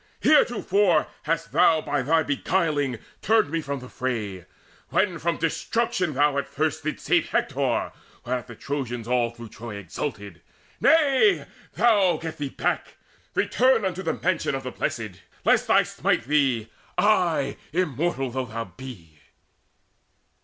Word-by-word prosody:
Heretofore 205 Hz, -, +3 dB, 0.2 s
hast 165 Hz, +1 st, -1 dB
thou 165 Hz, 0 st, +5 dB
By 145 Hz, -2 st, -1 dB
thy 160 Hz, +5 st, +2 dB
beguiling 145 Hz, -3 st, 0 dB, 0.2 s
turned 220 Hz, -8 st, +3 dB
me 165 Hz, 0 st, 0 dB
from 140 Hz, -3 st, -4 dB
the 125 Hz, -, -9 dB
fray, 110 Hz, -9 st, -4 dB, 0.4 s
When 180 Hz, -5 st, +1 dB
from 170 Hz, +1 st, 0 dB
destruction 185 Hz, -, -1 dB
thou 145 Hz, 0 st, +3 dB
at 140 Hz, -, -4 dB
the -, -, -24 dB
first 155 Hz, +2 st, -1 dB
didst 155 Hz, -, -4 dB
save -, -, +2 dB
Hector, -, -, 0 dB, 0.3 s
whereat 125 Hz, -1 st, -2 dB
the 120 Hz, -, -10 dB
Trojans 120 Hz, -3 st, -4 dB
all 120 Hz, -1 st, +2 dB
through 115 Hz, -1 st, -11 dB
Troy 115 Hz, 0 st, -8 dB
Exulted. 100 Hz, -, -6 dB, 0.4 s
Nay, 320 Hz, +4 st, +4 dB, 0.3 s
thou 205 Hz, -7 st, +4 dB
get 160 Hz, -1 st, -6 dB
thee 145 Hz, -2 st, -2 dB
back: -, -, -2 dB, 0.4 s
return 255 Hz, -4 st, +3 dB
Unto 185 Hz, 0 st, -2 dB
the -, -, -1 dB
mansion 170 Hz, -6 st, 0 dB
of 135 Hz, -, -4 dB
the 130 Hz, -, -5 dB
Blessed, 105 Hz, -5 st, -4 dB, 0.2 s
lest -, -, +3 dB
I -, -, +6 dB
smite -, -, 0 dB
thee 130 Hz, -5 st, +1 dB, 0.3 s
ay, 175 Hz, -9 st, +2 dB
immortal 155 Hz, -4 st, -1 dB
though 130 Hz, +1 st, -2 dB
thou 115 Hz, +1 st, -4 dB
be!" 95 Hz, -, -11 dB
145 Hz, 145 wpm, -25 LUFS, 125-175 Hz, 0.4 s, I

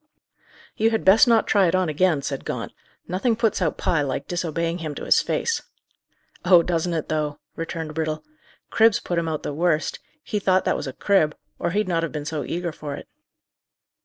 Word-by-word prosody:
"You 220 Hz, +1 st, +3 dB
had 225 Hz, -1 st, -1 dB
best 200 Hz, +6 st, +7 dB
not 230 Hz, -2 st, +4 dB
try 200 Hz, -3 st, +4 dB
it 170 Hz, -, +1 dB
on 185 Hz, -1 st, +2 dB
again," 155 Hz, -1 st, +1 dB
said 135 Hz, -1 st, -3 dB
Gaunt. -, -, -4 dB, 0.4 s
"Nothing 195 Hz, +6 st, +1 dB
puts 225 Hz, -3 st, 0 dB
out 165 Hz, -4 st, 0 dB
Pye 175 Hz, -5 st, +1 dB
like 135 Hz, -2 st, -3 dB
disobeying 170 Hz, 0 st, -2 dB
him 155 Hz, -3 st, -5 dB
to -, -, -6 dB
his -, -, +5 dB
face." 460 Hz, -1 st, -1 dB, 0.8 s
"Oh, 175 Hz, -2 st, +6 dB
doesn't 170 Hz, 0 st, -1 dB
it, 160 Hz, -, -2 dB
though!" 150 Hz, -2 st, -1 dB, 0.2 s
returned 165 Hz, -1 st, -5 dB
Brittle. 155 Hz, -1 st, -2 dB, 0.5 s
"Cribs 225 Hz, -1 st, +4 dB
put 175 Hz, -1 st, -2 dB
him 165 Hz, -, -2 dB
out 155 Hz, -2 st, -3 dB
the -, -, -3 dB
worst. 165 Hz, 0 st, 0 dB, 0.2 s
He 210 Hz, -, -2 dB
thought 185 Hz, -1 st, +2 dB
that -, -, +2 dB
was -, -, -4 dB
a 135 Hz, -, -5 dB
crib, 160 Hz, -3 st, +2 dB, 0.2 s
or 170 Hz, -, 0 dB
he'd 210 Hz, +3 st, 0 dB
not 170 Hz, -2 st, +1 dB
have 165 Hz, -, -2 dB
been 150 Hz, -1 st, -5 dB
so 155 Hz, -1 st, -3 dB
eager 175 Hz, 0 st, -3 dB
for 150 Hz, -2 st, -6 dB
it." -, -, -10 dB
170 Hz, 200 wpm, -23 LUFS, 155-185 Hz, 0.8 s, best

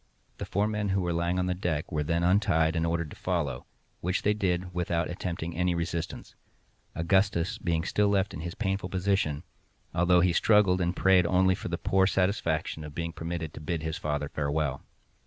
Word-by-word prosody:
The -, -, -4 dB
four 100 Hz, +2 st, +1 dB
men 105 Hz, -1 st, -1 dB
who 95 Hz, 0 st, +1 dB
were 90 Hz, -1 st, -1 dB
lying 85 Hz, +2 st, 0 dB
on 90 Hz, -, +1 dB
the 90 Hz, -, 0 dB
deck 90 Hz, -5 st, -2 dB
were 75 Hz, -, 0 dB
then 85 Hz, +3 st, 0 dB
untied 90 Hz, -3 st, +3 dB
and 85 Hz, 0 st, +1 dB
ordered 85 Hz, -2 st, -1 dB
to -, -, -9 dB
follow, -, -, -2 dB, 0.3 s
which 90 Hz, +2 st, -1 dB
they 105 Hz, -, +3 dB
did 90 Hz, -3 st, -1 dB
without 85 Hz, -1 st, -1 dB
attempting 85 Hz, -1 st, -4 dB
any 90 Hz, 0 st, +1 dB
resistance—Augustus 85 Hz, +2 st, -2 dB
being 80 Hz, -1 st, 0 dB
still 105 Hz, +4 st, +1 dB
left 100 Hz, -1 st, +1 dB
in -, -, -6 dB
his 85 Hz, +2 st, -5 dB
painful 95 Hz, -3 st, -2 dB
position, 95 Hz, -5 st, 0 dB, 0.5 s
although 90 Hz, +1 st, +4 dB
he 90 Hz, 0 st, +3 dB
struggled 95 Hz, -2 st, +4 dB
and 90 Hz, +1 st, 0 dB
prayed 95 Hz, -2 st, +4 dB
only 95 Hz, +1 st, +4 dB
for -, -, -5 dB
the 85 Hz, -1 st, -2 dB
poor 95 Hz, +2 st, +2 dB
satisfaction 90 Hz, -5 st, 0 dB
of 75 Hz, -1 st, -9 dB
being 85 Hz, 0 st, -3 dB
permitted 80 Hz, -2 st, -4 dB
to -, -, -9 dB
bid 80 Hz, 0 st, -3 dB
his 80 Hz, -1 st, -3 dB
father 75 Hz, -1 st, -2 dB
farewell. 70 Hz, -1 st, -1 dB
85 Hz, 190 wpm, -28 LUFS, 80-95 Hz, 0.5 s, although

